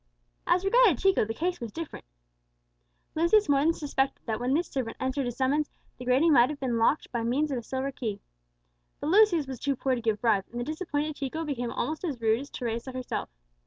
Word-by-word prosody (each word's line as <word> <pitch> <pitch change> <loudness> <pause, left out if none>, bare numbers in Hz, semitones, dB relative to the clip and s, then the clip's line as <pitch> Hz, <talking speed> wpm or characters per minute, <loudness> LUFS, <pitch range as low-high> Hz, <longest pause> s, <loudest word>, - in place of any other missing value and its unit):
As 365 +2 +2
regarded 435 - +5
Chico, 385 - +3
the 225 - -3
case 355 +2 -1
was 230 -3 -5
different. 330 - -7 1.1
Lucius 340 +6 +3
more 280 -1 +4
than 310 +4 +4
suspected 275 -4 -2
that 220 -2 -2
when 250 +3 +1
this 340 +3 0
servant 255 -4 -4
answered 260 +1 -1
his 240 - -5
summons, 280 +3 +1 0.3
the 250 - -7
grating 275 +6 +4
might 245 -1 +6
have 300 -2 -5
been 260 -2 -2
unlocked 230 +6 +1
by 235 - -1
means 270 +6 0
of 260 - -1
a - - -6
silver 265 +4 -3
key. 220 -6 -4 0.8
But 300 - -2
Lucius 380 -6 +5
was 260 -3 -7
too 280 -1 0
poor 260 +1 0
to 245 - -2
give 220 -2 0
bribes, 210 -5 +2
and 240 - -6
the - - -1
disappointed 310 0 -3
Chico 315 +4 -3
became 245 -5 -2
almost 310 +8 -3
as 295 -9 -3
rude 225 0 +2
as 280 +2 -8
Teresa 235 +1 -4
herself. 255 -1 -4
270 Hz, 215 wpm, -28 LUFS, 240-310 Hz, 1.1 s, might